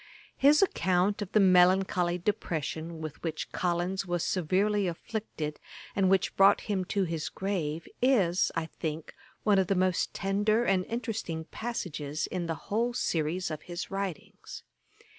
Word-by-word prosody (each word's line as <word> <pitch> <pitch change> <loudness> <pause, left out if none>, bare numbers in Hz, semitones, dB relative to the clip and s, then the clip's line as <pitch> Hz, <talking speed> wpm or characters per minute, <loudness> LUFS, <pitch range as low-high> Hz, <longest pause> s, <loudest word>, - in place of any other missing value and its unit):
His 295 +5 +5
account 190 - +1
of 200 - -4
the 215 - +4
melancholy 180 -1 +4
depression 165 -4 -3
with 155 -2 -7
which 160 -2 -4
Collins 180 +2 -1
was 175 -2 -2
severely 195 +3 +1
afflicted, 170 -4 -4 0.4
and 195 -2 +3
which 190 -1 +2
brought 195 0 +6
him 195 -3 -2
to 200 +1 0
his 165 -3 -3
grave, 170 -5 -3
is, 200 -9 +3
I 165 - -1
think, 160 -1 -5 0.3
one 205 -3 +4
of 190 - +1
the 195 - +1
most 185 -1 +1
tender 205 +4 +1
and 190 -3 +2
interesting 225 -8 -3
passages 155 -10 -4
in 175 -2 -3
the 165 - -1 0.2
whole 235 +2 +1
series 170 -2 -1
of 155 -1 -5
his 175 +1 -6
writings. 195 -4 -6
185 Hz, 145 wpm, -29 LUFS, 165-200 Hz, 0.4 s, brought